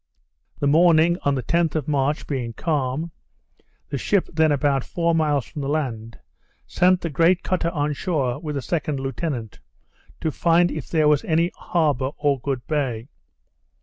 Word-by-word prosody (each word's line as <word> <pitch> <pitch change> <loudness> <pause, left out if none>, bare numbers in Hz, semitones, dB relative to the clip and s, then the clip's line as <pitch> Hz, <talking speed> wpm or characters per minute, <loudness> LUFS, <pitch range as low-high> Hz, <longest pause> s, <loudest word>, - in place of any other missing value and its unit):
The - - -2
morning, 165 +3 +4
on 140 -1 +1
the 130 - -3
10th 170 -2 +1
of 155 -4 -2
March, 145 0 0
being 125 -5 -3
calm, 150 +2 -2 0.8
the - - -3
ship 200 -3 +1
then 160 -1 +3
about 140 -2 +1
four 170 -1 0
miles 150 -5 +1
from 150 - -7
the 135 - -3
land, 115 -7 -3 0.5
sent 180 0 +2
the 170 - -3
great 170 +5 +3
cutter 180 -2 0
on 150 -3 -1
shore 140 -6 -1
with 150 -2 -5
the 140 - -3
second 150 -1 -2
lieutenant, 135 -4 -4 0.6
to 160 - 0
find 170 +3 +3
if 155 - -6
there 155 -2 +2
was 150 -1 +3
any 165 +2 +1
harbour 145 -6 0
or 145 -2 +1
good 130 -2 -3
bay. 135 -5 -2
150 Hz, 165 wpm, -23 LUFS, 135-165 Hz, 0.8 s, morning